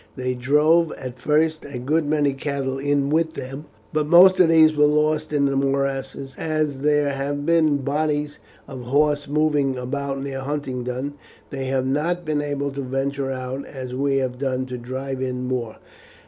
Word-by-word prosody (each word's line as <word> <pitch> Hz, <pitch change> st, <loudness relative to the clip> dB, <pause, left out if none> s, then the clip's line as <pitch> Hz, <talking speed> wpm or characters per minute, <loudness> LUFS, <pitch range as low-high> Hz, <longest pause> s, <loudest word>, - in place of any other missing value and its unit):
They 125 Hz, -1 st, -2 dB
drove 150 Hz, +6 st, +3 dB
at 125 Hz, -1 st, -8 dB
first 155 Hz, +3 st, +1 dB
a 140 Hz, -3 st, -7 dB
good 150 Hz, +5 st, 0 dB
many 145 Hz, -2 st, +2 dB
cattle 135 Hz, -1 st, -3 dB
in 145 Hz, 0 st, 0 dB
with 160 Hz, +1 st, +1 dB
them, 135 Hz, +3 st, -7 dB, 0.3 s
but 150 Hz, -1 st, 0 dB
most 180 Hz, +3 st, +7 dB
of 175 Hz, -3 st, +6 dB
these 160 Hz, -1 st, +6 dB
were 150 Hz, 0 st, +5 dB
lost 150 Hz, +1 st, +1 dB
in 145 Hz, -2 st, +2 dB
the 140 Hz, 0 st, +1 dB
morasses, 135 Hz, 0 st, -1 dB
and 160 Hz, -, -3 dB
as 155 Hz, -3 st, 0 dB
there 145 Hz, 0 st, +2 dB
have 140 Hz, +1 st, -3 dB
been 160 Hz, -3 st, +3 dB
bodies 145 Hz, +1 st, -1 dB, 0.3 s
of 130 Hz, -3 st, -8 dB
horse 145 Hz, +2 st, +1 dB
moving 145 Hz, -2 st, +1 dB
about 135 Hz, +2 st, -3 dB
near 135 Hz, -1 st, -4 dB
Huntingdon, 135 Hz, -1 st, -3 dB, 0.4 s
they 135 Hz, -1 st, -4 dB
have 130 Hz, 0 st, 0 dB
not 165 Hz, +6 st, -1 dB
been 150 Hz, -1 st, 0 dB
able 140 Hz, -1 st, -2 dB
to 140 Hz, +1 st, -5 dB
venture 135 Hz, +1 st, -2 dB
out 130 Hz, +1 st, -4 dB
as 130 Hz, -2 st, -7 dB
we 135 Hz, +1 st, +1 dB
have 130 Hz, -2 st, -2 dB
done 130 Hz, -2 st, -1 dB
to 125 Hz, -1 st, -6 dB
drive 130 Hz, +2 st, -5 dB
in 125 Hz, -1 st, -2 dB
more." 125 Hz, -3 st, -3 dB
140 Hz, 175 wpm, -22 LUFS, 130-150 Hz, 0.4 s, most